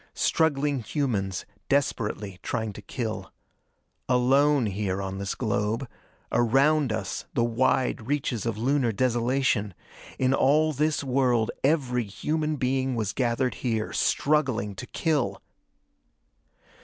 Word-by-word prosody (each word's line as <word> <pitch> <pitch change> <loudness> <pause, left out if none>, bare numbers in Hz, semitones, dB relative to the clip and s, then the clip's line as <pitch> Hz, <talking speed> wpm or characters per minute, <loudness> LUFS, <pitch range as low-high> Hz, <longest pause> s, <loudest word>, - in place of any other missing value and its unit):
Struggling 145 -3 +1
humans, 105 - -2 0.2
desperately 105 -8 -1
trying 110 -3 -3
to 105 - -9
kill. 110 +2 -4 0.8
Alone 135 +2 +4
here 100 -2 -2
on 95 0 -4
this 100 0 -3
globe. 110 +2 -1 0.4
Around 135 +4 +3
us, 110 -3 -3
the 120 - +3
wide 120 -1 +1
reaches 130 -6 -1
of 115 -2 -2
Lunar 130 +1 +1
desolation. 120 -3 +1 0.4
In 130 0 +2
all 155 +4 +3
this 150 +1 0
world, 125 -4 +2
every 130 -5 +1
human 155 +9 -2
being 130 -1 0
was 110 -3 -1
gathered 125 0 0
here, 110 -3 -1
struggling 130 -9 +1
to 95 - -8
kill! 135 - 0
125 Hz, 115 wpm, -26 LUFS, 110-140 Hz, 0.8 s, Alone